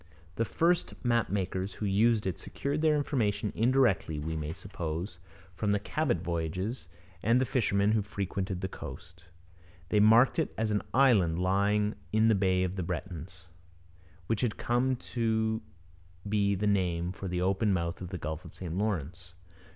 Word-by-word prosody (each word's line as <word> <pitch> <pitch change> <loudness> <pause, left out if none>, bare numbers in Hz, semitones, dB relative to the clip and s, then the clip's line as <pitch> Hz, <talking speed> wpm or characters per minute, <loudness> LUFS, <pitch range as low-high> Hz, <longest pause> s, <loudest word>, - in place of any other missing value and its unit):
The 115 - 0
first 170 - +1
map 120 -1 +2
makers 95 0 -2
who 105 - -4
used 105 +2 +3
it 95 - -2
secured 145 +2 -3
their 155 -1 +4
information 110 -8 0
indirectly, 120 - +2
we 80 +2 -3
may 75 -1 -3
suppose, 85 0 -5 0.3
from 100 +3 0
the 105 - +2
Cabot 100 - -1
voyages 85 +7 -3 0.3
and 115 +4 +3
the 130 - +2
fishermen 100 -5 +2
who 110 -1 +2
frequented 95 -2 -3
the 95 - -1
coast. 85 -2 -10 0.6
They 105 - +3
marked 115 +8 +6
it 160 - -1
as 110 -1 0
an 105 - +1
island 110 -11 +4
lying 100 +3 +2 0.2
in 110 +1 +4
the - - +5
'Bay 95 -2 +2
of 95 +1 -2
the - - -1
Bretons,' 90 +1 -6 0.8
which 115 +1 -1
had 120 -4 0
come 125 +2 +1 0.2
to 110 -1 +1 0.7
be 100 -1 +2
the 100 +3 -2
name 90 -4 +1
for 95 +1 -6
the 90 0 -1
open 100 +3 +2
mouth 85 -1 -1
of 90 - -5
the 90 - -4
Gulf 80 0 -5
of - - -12
St 85 -3 -5
Lawrence. 90 -3 -3
100 Hz, 165 wpm, -30 LUFS, 90-110 Hz, 0.8 s, marked